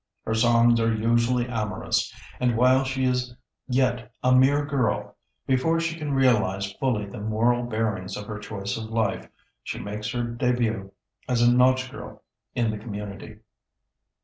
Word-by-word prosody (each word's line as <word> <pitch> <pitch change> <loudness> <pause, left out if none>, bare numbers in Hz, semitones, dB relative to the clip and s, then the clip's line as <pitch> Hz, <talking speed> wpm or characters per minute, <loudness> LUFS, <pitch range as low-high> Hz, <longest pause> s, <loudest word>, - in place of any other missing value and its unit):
Her 110 - -1
songs 115 +1 +4
are 115 0 +2
usually 120 +2 +1
amorous; 110 -4 -1 0.3
and 125 -2 +1
while 130 +2 +5
she 130 0 -1
is 125 -1 -1 0.3
yet 125 -2 0
a 125 - +4
mere 140 +3 +4
girl, 130 -7 -1 0.3
before 135 +6 +2
she 165 0 -1
can 150 -4 -3
realize 105 -7 +2
fully 120 -6 0
the 100 - -9
moral 115 +3 +1
bearings 110 -5 -2
of 105 - -6
her 105 -1 -6
choice 100 -1 -4
of 110 - -5
life, 110 0 -1 0.3
she - - -5
makes 105 +1 -5
her 120 +2 -2
debut 120 -4 -1 0.4
as 120 -2 +2
a 120 0 +5
nautch 130 +1 +3
girl - - -10 0.3
in 115 -2 +1
the 105 - -5
community. 105 0 -8
120 Hz, 155 wpm, -25 LUFS, 110-125 Hz, 0.4 s, while